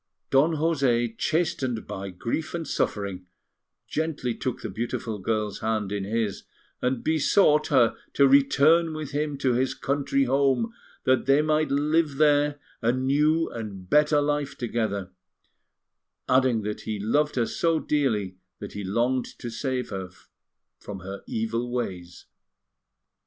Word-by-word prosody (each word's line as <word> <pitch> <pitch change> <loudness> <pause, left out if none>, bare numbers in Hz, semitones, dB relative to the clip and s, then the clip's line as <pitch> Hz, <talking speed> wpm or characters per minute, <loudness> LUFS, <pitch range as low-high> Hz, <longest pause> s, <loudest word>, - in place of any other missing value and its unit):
Don 150 +5 +4
José, 135 -8 +1
chastened 135 -7 -1
by 95 0 -6
grief 115 - -3
and 165 -2 -4
suffering, 95 -3 -2 0.6
gently 155 -6 -2
took 125 +2 -4
the - - -3
beautiful 110 0 -3
girl's 105 +1 -2
hand 110 -3 -1
in 100 -1 -2
his 110 -1 -1 0.4
and 125 -1 -1
besought 155 0 +3
her 125 -5 +4 0.2
to 140 - +5
return 150 +4 +4
with 155 -3 -5
him 150 0 -2
to 130 -2 +1
his 130 +2 0
country 140 0 0
home, 135 - +1 0.3
that 130 0 +2
they 140 +2 +5
might 155 0 +1
there 140 - +1
live 150 -1 +2 0.2
a 115 0 +3
new 150 +6 +2
and 100 -5 -7
better 150 0 +4
life 145 -1 -1
together; 110 -6 -2 1.2
adding 130 -4 +3
that 105 0 -4
he 110 -2 -4
loved 145 +9 +1
her 120 -2 +2
so 165 +6 +1
dearly 110 -13 0 0.2
that 100 - -8
he 105 - -5
longed 120 +6 0
to 120 - -6
save 130 0 -3
her 95 -2 -4 0.7
from 100 -2 -8
her 95 +2 -7
evil 115 +2 -2
ways. 90 -8 -5
130 Hz, 140 wpm, -26 LUFS, 110-150 Hz, 1.2 s, to